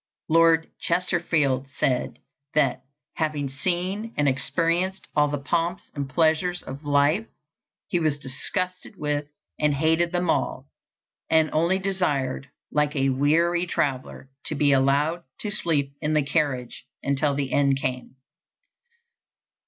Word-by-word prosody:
Lord 165 0 +5
Chesterfield 165 -7 +1
said 125 -2 0 0.4
that, 140 -5 +2 0.4
having 150 -3 -1
seen 185 - -2
and 145 0 +2
experienced 170 +7 0
all 150 -1 +4
the 145 0 -2
pomps 170 +5 -2
and 140 -2 -4
pleasures 165 +4 +1
of 135 +3 -8
life, 145 +9 +2 0.6
he 175 - 0
was 155 -3 +1
disgusted 180 +9 -4
with 145 -1 -1 0.3
and 150 -1 +2
hated 160 +3 +2
them 180 0 0
all, 135 -4 0 0.6
and 160 -1 +3
only 170 +4 +2
desired, 150 -9 -1 0.2
like 150 0 +1
a 135 -1 +2
weary 165 +6 +2
traveler, 135 -2 -2
to 155 - -1
be 145 -1 +3
allowed 140 +5 +2 0.2
"to 210 - -2
sleep 150 -9 +1
in 155 0 0
the 150 - +3
carriage" 135 -4 -1 0.2
until 140 +1 +1
the 140 -1 -2
end 140 -1 +3
came. 130 -1 -4
150 Hz, 130 wpm, -25 LUFS, 140-170 Hz, 0.6 s, Lord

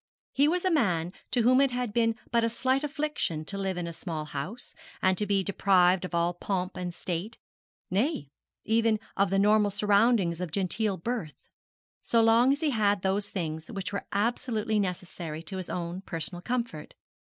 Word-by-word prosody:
He 280 +2 +4
was 360 +3 0
a 375 - +3
man 180 - +1 0.2
to 240 - +1
whom 255 +3 +5
it 275 - +4
had 245 -3 -3
been 230 -1 +2 0.2
but 235 -1 +3
a 230 - +2
slight 260 +4 0
affliction 295 - -2
to 200 - -5
live 190 -2 -2
in 175 - -2
a 170 - -5
small 160 -3 -5
house, 155 - -6 0.3
and 185 0 +3
to 210 +2 -2
be 195 -1 +2
deprived 185 -2 +3
of 180 - -5
all 170 +1 +2
pomp 185 +1 -3
and 180 -1 -3
state, 180 +6 -4 0.5
nay, 195 - 0 0.3
even 225 0 +2 0.2
of 200 0 +2
the 195 - +1
normal 210 +1 +4
surroundings 200 -3 +2
of 180 - -2
gentle 195 +3 -1
birth, 190 -6 -4 0.6
so 230 - +2
long 230 +3 +5
as 285 - 0
he 310 -2 +2
had 205 -4 +2
those 200 +2 0
things 160 -4 -4
which 200 -3 -5
were 200 - -4
absolutely 220 0 0
necessary 175 -4 -4
to 190 +3 -6
his 185 - -5
own 175 +1 -4
personal 175 -1 -4
comfort. 235 -9 -3
200 Hz, 185 wpm, -28 LUFS, 180-230 Hz, 0.6 s, whom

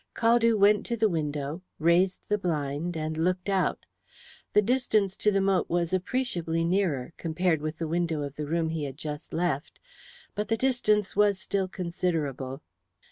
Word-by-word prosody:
Caldew 230 -1 +4
went 205 +1 +5
to 235 - -1
the 220 0 +4
window, 150 -2 -2 0.2
raised 175 +3 +3
the 210 0 +1
blind, 160 -1 -2
and 155 0 -3
looked 180 +4 0
out. 195 -2 0 0.7
The 210 - +5
distance 215 -5 +1
to 210 - +3
the 195 -1 +2
moat 195 -1 +1
was 170 0 0
appreciably 180 -5 -1
nearer, 170 -6 0
compared 165 -1 0
with 155 +1 -4
the 165 - -3
window 165 -2 -1
of 140 -1 -5
the 150 0 -4
room 165 +1 0
he 160 -2 -2
had 135 -1 -7
just 150 0 -6
left, 160 -4 -2 0.5
but 210 - -2
the 225 - +1
distance 215 -6 +1
was 205 -1 +4
still 190 0 -1
considerable. 160 -7 -3
175 Hz, 165 wpm, -28 LUFS, 155-200 Hz, 0.7 s, went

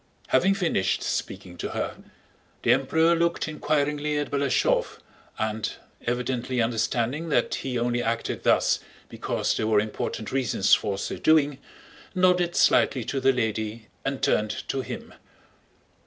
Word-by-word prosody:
Having 195 +1 +4
finished 170 - 0
speaking 90 -1 -4
to - - -4
her, - - -3 0.7
the 120 - +5
Emperor 160 +6 +3
looked 170 0 0
inquiringly 150 -1 0
at 145 -1 -2
Balashëv 140 -2 +1 0.4
and, 110 0 -2 0.3
evidently 125 +1 -1
understanding 120 +6 0
that 120 - +1
he 130 -2 -2
only 120 0 0
acted 115 0 -2
thus - - +3 0.3
because - - -1
there 110 - -1
were 110 -2 +4
important 110 0 -3
reasons 125 -7 +1
for 100 -2 +3
so - - -4
doing, 150 -3 +3 0.6
nodded 180 -1 +3
slightly 130 - +3
to 135 +4 -2
the 135 0 +4
lady 110 -2 -3
and 135 0 -3
turned 105 -6 0
to 135 - -1
him. - - -7
130 Hz, 135 wpm, -26 LUFS, 115-150 Hz, 0.7 s, the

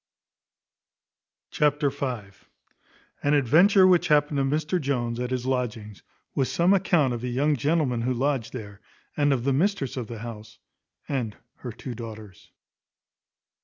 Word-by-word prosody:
Chapter 145 -1 +1
v. 125 -8 -4 0.9
An 145 +1 +2
adventure 175 - +5
which 180 -2 +4
happened 150 -1 +3
to - - +2
Mr 155 +5 0
Jones 120 -4 -1
at 125 0 -2
his 130 -1 -2
lodgings, 110 -7 -3 0.3
with 135 - +1
some 175 +3 +3
account 175 -9 +2
of 120 0 -5
a - - -2
young 140 +5 +1
gentleman 140 -2 0
who 125 +2 0
lodged 135 -2 -1
there, 105 -5 -9 0.3
and 145 -1 +2
of 130 -4 0
the 135 +1 +1
mistress 150 - 0
of 120 -3 -4
the 115 - -7
house, 110 -1 -9 0.5
and 120 -7 -3 0.2
her 125 - -7
two 125 +3 -7
daughters. 110 -4 -10
130 Hz, 145 wpm, -25 LUFS, 115-150 Hz, 0.9 s, adventure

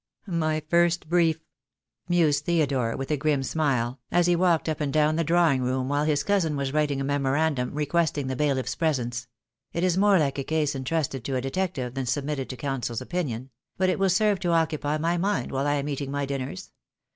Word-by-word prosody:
"My 155 -5 -1
first 170 0 +2
brief," 165 -1 +3 0.7
mused 155 -4 +2
Theodore, 140 -9 +1
with 135 +2 -4
a 150 - +2
grim 145 -1 +1
smile, 125 -2 0
as 175 0 +3
he 175 0 +3
walked 170 -2 +2
up 155 -1 -2
and 145 -2 0
down 155 +1 +3
the 165 - +1
drawing 165 -4 +3
room 130 +1 -1
while 145 +1 +1
his 150 -2 +1
cousin 170 -4 +1
was 140 -1 -2
writing 150 -2 +1
a - - -1
memorandum 140 -1 0
requesting 150 -1 0
the 130 0 -2
bailiff's 135 -2 0
presence. 125 -6 -1 0.5
"It 170 - -1
is 185 0 +2
more 200 -1 +5
like 140 -4 0
a - - -1
case 155 0 0
entrusted 135 -1 -2
to 135 - -2
a 130 - 0
detective 135 -3 -2
than 135 -1 -3
submitted 140 0 -2
to 130 - -6
counsel's 120 -3 -3
opinion; 135 -8 -4 0.3
but 185 0 +2
it - - -2
will 195 0 +3
serve 205 +1 +2
to 175 - -1
occupy 155 -2 +1
my 170 +3 0
mind 200 +3 -1
while 135 +1 -1
I 145 - +2
am 145 0 -2
eating 140 -1 -3
my 140 0 -1
dinners. 135 -6 -5
150 Hz, 205 wpm, -26 LUFS, 135-165 Hz, 0.7 s, more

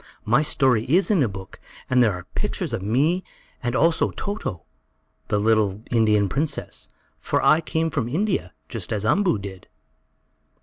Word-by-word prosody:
"My 120 +7 +4
story 130 -6 +2
is 185 - +3
in 190 -7 +3
a 130 - +3
book, 95 -2 -9 0.3
and 130 -1 +3
there 110 -4 +4
are 90 -1 -7
pictures - - -2
of - - -2
me, 145 - +1 0.4
and 120 0 -2
also 165 +3 +3
Toto, 200 - -5 0.6
the 105 - +1
little 110 -1 +1
Indian 105 -3 +3
princess. 145 +8 -3 0.3
For - - 0
I 155 +4 +5
came 160 0 -1
from 140 -6 -1
India, 180 - -1 0.2
just - - -6
as 105 -1 -1
Umboo 180 - +3
did." 95 -2 -9
120 Hz, 160 wpm, -23 LUFS, 105-160 Hz, 0.6 s, I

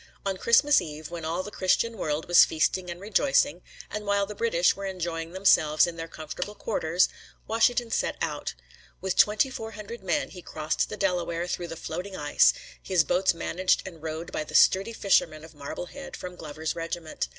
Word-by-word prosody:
On 195 -1 0
Christmas 255 +9 +4
Eve, 155 +1 -8
when 170 -1 -6
all 170 +3 -1
the 210 - -8
Christian 225 +5 +1
world 155 -5 -2
was 175 - +8
feasting 180 +3 0
and 175 0 -6
rejoicing, 200 - +2 0.3
and 210 0 -4
while 200 -1 +1
the 210 - -7
British 200 -5 +2
were 195 0 -5
enjoying 170 -3 -4
themselves 165 -5 +4
in 175 -1 -5
their 165 0 -6
comfortable 160 +6 -6
quarters, 170 -1 +1 0.4
Washington 230 +1 +2
set - - 0
out. - - -3 0.4
With 190 -1 -2
twenty 215 +6 +4
four 225 -3 -6
hundred 215 +2 -8
men 175 - 0
he 180 - -10
crossed 155 -2 -2
the 210 - -6
Delaware 175 -3 0
through 175 -1 -3
the 165 - -6
floating 180 +5 -5
ice, 145 0 +4 0.3
his 180 -4 +2
boats 185 +1 +2
managed 185 +2 +1
and 165 -4 -10
rowed 160 +1 -5
by - - -2
the - - -9
sturdy 195 +4 +5
fishermen 160 -7 +1
of 160 - -15
Marblehead 175 - -7
from 180 0 -7
Glover's 155 -1 -5
regiment. 165 -1 -4
180 Hz, 185 wpm, -27 LUFS, 165-200 Hz, 0.4 s, was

